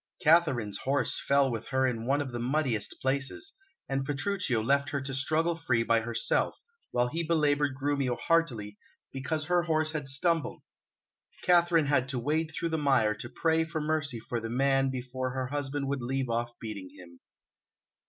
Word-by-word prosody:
Katharine's 150 Hz, -, +3 dB
horse 140 Hz, +2 st, 0 dB
fell 140 Hz, -1 st, +4 dB
with 115 Hz, -1 st, -4 dB
her 130 Hz, 0 st, +1 dB
in 120 Hz, -2 st, -2 dB
one 140 Hz, +2 st, +2 dB
of 135 Hz, -3 st, -4 dB
the 120 Hz, -, -4 dB
muddiest 125 Hz, -3 st, 0 dB
places, 140 Hz, -, -1 dB, 0.3 s
and 135 Hz, 0 st, -1 dB
Petruchio 145 Hz, -, -1 dB
left 140 Hz, +4 st, +2 dB
her 145 Hz, -3 st, -1 dB
to 135 Hz, 0 st, -5 dB
struggle 160 Hz, +5 st, +1 dB
free 125 Hz, -8 st, +1 dB
by 115 Hz, 0 st, +3 dB
herself, 115 Hz, 0 st, 0 dB, 0.3 s
while 120 Hz, 0 st, +1 dB
he 165 Hz, +6 st, -2 dB
belaboured 150 Hz, -4 st, +1 dB
Grumio 140 Hz, -3 st, 0 dB
heartily 120 Hz, -12 st, 0 dB, 0.3 s
because 150 Hz, +4 st, -2 dB
her 175 Hz, +1 st, +3 dB
horse 155 Hz, -2 st, +1 dB
had 150 Hz, -3 st, -4 dB
stumbled. 160 Hz, +4 st, 0 dB, 0.8 s
Katharine 175 Hz, -3 st, +4 dB
had 140 Hz, -2 st, +1 dB
to 135 Hz, -, -2 dB
wade 155 Hz, +5 st, 0 dB
through 170 Hz, -, -2 dB
the 160 Hz, -1 st, -1 dB
mire 130 Hz, -7 st, +3 dB
to 120 Hz, -, -8 dB
pray 160 Hz, +3 st, +1 dB
for 160 Hz, 0 st, -4 dB
mercy 150 Hz, -5 st, -1 dB
for 120 Hz, +1 st, -4 dB
the 115 Hz, 0 st, -5 dB
man 135 Hz, +2 st, +2 dB
before 130 Hz, 0 st, -4 dB
her 130 Hz, -1 st, -1 dB
husband 145 Hz, -1 st, -2 dB
would 140 Hz, -1 st, -2 dB
leave 130 Hz, 0 st, -2 dB
off 120 Hz, +1 st, -2 dB
beating 100 Hz, -4 st, -6 dB
him. 85 Hz, -2 st, -14 dB
135 Hz, 175 wpm, -29 LUFS, 120-155 Hz, 0.8 s, fell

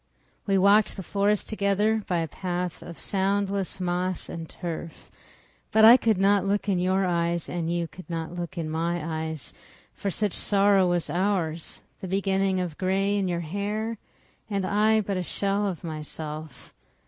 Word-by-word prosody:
We 195 Hz, -1 st, +3 dB
walked 200 Hz, +2 st, +4 dB
the 190 Hz, -, -5 dB
forest 205 Hz, +2 st, +1 dB
together, 210 Hz, +1 st, +1 dB
By 175 Hz, -2 st, +1 dB
a 165 Hz, -, -2 dB
path 180 Hz, +2 st, -4 dB
of 170 Hz, -, -9 dB
soundless 195 Hz, 0 st, -1 dB
moss 180 Hz, 0 st, -1 dB
and 165 Hz, -1 st, -6 dB
turf. 170 Hz, -2 st, -7 dB, 0.6 s
But 220 Hz, 0 st, +6 dB
I 230 Hz, +2 st, +11 dB
could 225 Hz, -5 st, +2 dB
not 195 Hz, 0 st, +4 dB
look 200 Hz, +1 st, 0 dB
in 190 Hz, -3 st, +2 dB
your 185 Hz, +2 st, +2 dB
eyes, 170 Hz, -1 st, 0 dB
And 170 Hz, -1 st, -2 dB
you 170 Hz, -1 st, -1 dB
could 185 Hz, +2 st, -13 dB
not 165 Hz, 0 st, -4 dB
look 175 Hz, -1 st, -5 dB
in 165 Hz, -2 st, -2 dB
my 160 Hz, 0 st, -2 dB
eyes, 160 Hz, -3 st, -5 dB, 0.4 s
For 200 Hz, -, -3 dB
such 200 Hz, +1 st, 0 dB
sorrow 200 Hz, -2 st, +3 dB
was 175 Hz, -2 st, 0 dB
ours—the 180 Hz, 0 st, -2 dB
beginning 195 Hz, 0 st, +1 dB
of 175 Hz, -4 st, -4 dB
gray 195 Hz, +2 st, +1 dB
in 200 Hz, -2 st, 0 dB
your 175 Hz, -1 st, -1 dB
hair. 205 Hz, +6 st, -3 dB, 0.5 s
And 200 Hz, -2 st, -1 dB
I 215 Hz, +2 st, +3 dB
but 200 Hz, -2 st, -2 dB
a -, -, 0 dB
shell 200 Hz, +3 st, 0 dB
of 185 Hz, -3 st, -4 dB
myself. 155 Hz, -1 st, -7 dB
185 Hz, 165 wpm, -26 LUFS, 170-200 Hz, 0.6 s, I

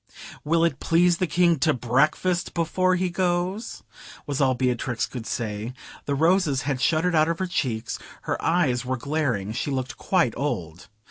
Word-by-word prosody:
"Will 165 Hz, +2 st, +2 dB
it 145 Hz, -5 st, -1 dB
please 175 Hz, +1 st, +3 dB
the 185 Hz, -, +1 dB
King 170 Hz, 0 st, +3 dB
to 155 Hz, +2 st, +2 dB
breakfast 150 Hz, +9 st, +1 dB
before 185 Hz, +2 st, +1 dB
he 180 Hz, 0 st, -1 dB
goes?" 180 Hz, +4 st, -1 dB, 0.4 s
was 145 Hz, 0 st, -2 dB
all 130 Hz, -1 st, +3 dB
Beatrix 125 Hz, -1 st, -1 dB
could 120 Hz, -3 st, -7 dB
say. 110 Hz, 0 st, -3 dB, 0.3 s
The 140 Hz, -, -1 dB
roses 160 Hz, -3 st, +2 dB
had 135 Hz, -2 st, -2 dB
shuddered 165 Hz, +4 st, +2 dB
out 155 Hz, 0 st, +4 dB
of 165 Hz, -, -1 dB
her 190 Hz, -, -1 dB
cheeks; 125 Hz, -10 st, -2 dB, 0.2 s
her -, -, -3 dB
eyes 155 Hz, -8 st, +2 dB
were 130 Hz, +1 st, -2 dB
glaring; 130 Hz, -8 st, -1 dB
she 125 Hz, -, -2 dB
looked 130 Hz, -2 st, -3 dB
quite 175 Hz, -, +1 dB
old. 90 Hz, -, -4 dB
150 Hz, 170 wpm, -25 LUFS, 125-175 Hz, 0.4 s, out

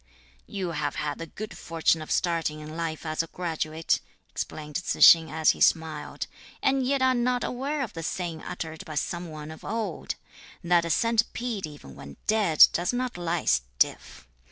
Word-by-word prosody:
"You 185 Hz, -3 st, -3 dB
have -, -, -2 dB
had 150 Hz, -1 st, -3 dB
the 165 Hz, -, -5 dB
good 215 Hz, +6 st, -7 dB
fortune 165 Hz, -1 st, +1 dB
of 155 Hz, -, -8 dB
starting 165 Hz, -3 st, 0 dB
in 155 Hz, +1 st, -8 dB
life 165 Hz, -1 st, -3 dB
as 155 Hz, +1 st, 0 dB
a 165 Hz, -, -6 dB
graduate," 160 Hz, -2 st, -1 dB, 0.3 s
explained 150 Hz, -1 st, -4 dB
Tzu 185 Hz, -, -3 dB
tsing 165 Hz, -1 st, +9 dB
as 160 Hz, +1 st, +3 dB
he -, -, -8 dB
smiled, 160 Hz, -2 st, +1 dB, 0.4 s
"and 270 Hz, 0 st, +3 dB
yet 265 Hz, +1 st, +1 dB
are 260 Hz, 0 st, +5 dB
not 245 Hz, 0 st, +1 dB
aware 275 Hz, +3 st, -2 dB
of 235 Hz, -, -6 dB
the 165 Hz, -, -5 dB
saying 165 Hz, 0 st, -3 dB
uttered 160 Hz, +2 st, -6 dB
by 155 Hz, -5 st, -8 dB
some 175 Hz, +3 st, -2 dB
one 155 Hz, 0 st, -8 dB
of 160 Hz, -, -11 dB
old: 215 Hz, -7 st, -3 dB, 0.5 s
that 175 Hz, -1 st, +3 dB
a -, -, -3 dB
centipede 230 Hz, 0 st, 0 dB
even 145 Hz, -, -12 dB
when 70 Hz, 0 st, -11 dB
dead 205 Hz, -8 st, +7 dB
does 175 Hz, +1 st, 0 dB
not 250 Hz, 0 st, -2 dB
lie 175 Hz, -1 st, -2 dB
stiff. -, -, 0 dB
165 Hz, 180 wpm, -27 LUFS, 155-215 Hz, 0.5 s, tsing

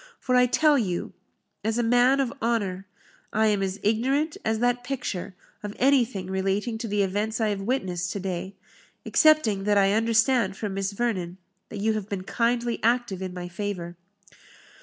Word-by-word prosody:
For 255 Hz, -, -2 dB
I 250 Hz, 0 st, +5 dB
tell 295 Hz, +2 st, +4 dB
you, 180 Hz, -6 st, -3 dB, 0.5 s
as 220 Hz, +2 st, 0 dB
a 240 Hz, -, +1 dB
man 245 Hz, +3 st, +4 dB
of 265 Hz, -2 st, 0 dB
honour, 200 Hz, -5 st, -1 dB, 0.4 s
I 220 Hz, +1 st, +2 dB
am 210 Hz, -2 st, +2 dB
as 195 Hz, 0 st, -2 dB
ignorant 265 Hz, +9 st, +1 dB
as 220 Hz, 0 st, 0 dB
that 245 Hz, +1 st, +1 dB
picture 210 Hz, -8 st, -4 dB, 0.3 s
of 205 Hz, 0 st, -6 dB
anything 245 Hz, -7 st, +2 dB
relating 195 Hz, +4 st, -1 dB
to 230 Hz, -, -4 dB
the 205 Hz, -1 st, +1 dB
events 205 Hz, +4 st, -1 dB
I 220 Hz, -1 st, +1 dB
have 200 Hz, -1 st, -2 dB
witnessed 185 Hz, -6 st, -2 dB
to 200 Hz, -, -4 dB
day, 190 Hz, 0 st, -4 dB, 0.5 s
excepting 305 Hz, -, +4 dB
that 205 Hz, -1 st, +3 dB
I 195 Hz, 0 st, +4 dB
understand 225 Hz, -2 st, +2 dB
from 210 Hz, -3 st, -4 dB
Miss 195 Hz, 0 st, -2 dB
Vernon, 190 Hz, -6 st, -2 dB, 0.3 s
that 205 Hz, -, -6 dB
you 220 Hz, +1 st, +2 dB
have 215 Hz, -2 st, -4 dB
been 195 Hz, -3 st, -3 dB
kindly 235 Hz, +2 st, 0 dB
active 235 Hz, -5 st, +1 dB
in 185 Hz, -1 st, -4 dB
my 180 Hz, -1 st, -6 dB
favour." 175 Hz, -2 st, -5 dB
215 Hz, 175 wpm, -26 LUFS, 195-240 Hz, 0.5 s, I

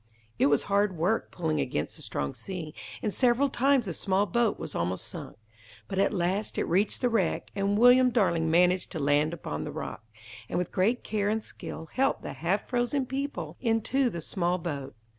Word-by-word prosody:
It -, -, +5 dB
was 145 Hz, -1 st, +3 dB
hard 200 Hz, -2 st, +1 dB
work 185 Hz, +8 st, +1 dB
pulling 160 Hz, -4 st, -1 dB
against 75 Hz, -, -2 dB
the -, -, -10 dB
strong 70 Hz, -1 st, -3 dB
sea, 175 Hz, -5 st, -6 dB, 0.3 s
and 210 Hz, -, 0 dB
several 255 Hz, +2 st, +3 dB
times 265 Hz, -1 st, +3 dB
the 180 Hz, -, -3 dB
small 195 Hz, +3 st, +1 dB
boat 225 Hz, +3 st, +1 dB
was -, -, -6 dB
almost 90 Hz, +2 st, -2 dB
sunk. -, -, -8 dB, 0.5 s
But 195 Hz, -1 st, -2 dB
at 200 Hz, -, +3 dB
last 190 Hz, +2 st, -1 dB
it -, -, +2 dB
reached 195 Hz, +5 st, +1 dB
the 250 Hz, -, +3 dB
wreck, 230 Hz, -, 0 dB
and 200 Hz, 0 st, +1 dB
William 250 Hz, +2 st, +7 dB
Darling 170 Hz, -9 st, +2 dB
managed 180 Hz, +2 st, +3 dB
to 160 Hz, -, -3 dB
land 145 Hz, +2 st, +2 dB
upon 155 Hz, -, -4 dB
the -, -, -5 dB
rock, -, -, -6 dB, 0.5 s
and -, -, -1 dB
with 180 Hz, -1 st, -1 dB
great 220 Hz, +7 st, +1 dB
care 205 Hz, -2 st, 0 dB
and 220 Hz, 0 st, 0 dB
skill 160 Hz, -, -8 dB
helped 270 Hz, +1 st, +1 dB
the -, -, -5 dB
half 170 Hz, +9 st, -1 dB
frozen 250 Hz, +2 st, 0 dB
people 250 Hz, -, -4 dB
into 245 Hz, +3 st, +2 dB
the 170 Hz, -6 st, -5 dB
small 175 Hz, +2 st, 0 dB
boat. 145 Hz, -7 st, -5 dB
195 Hz, 195 wpm, -28 LUFS, 165-235 Hz, 0.5 s, William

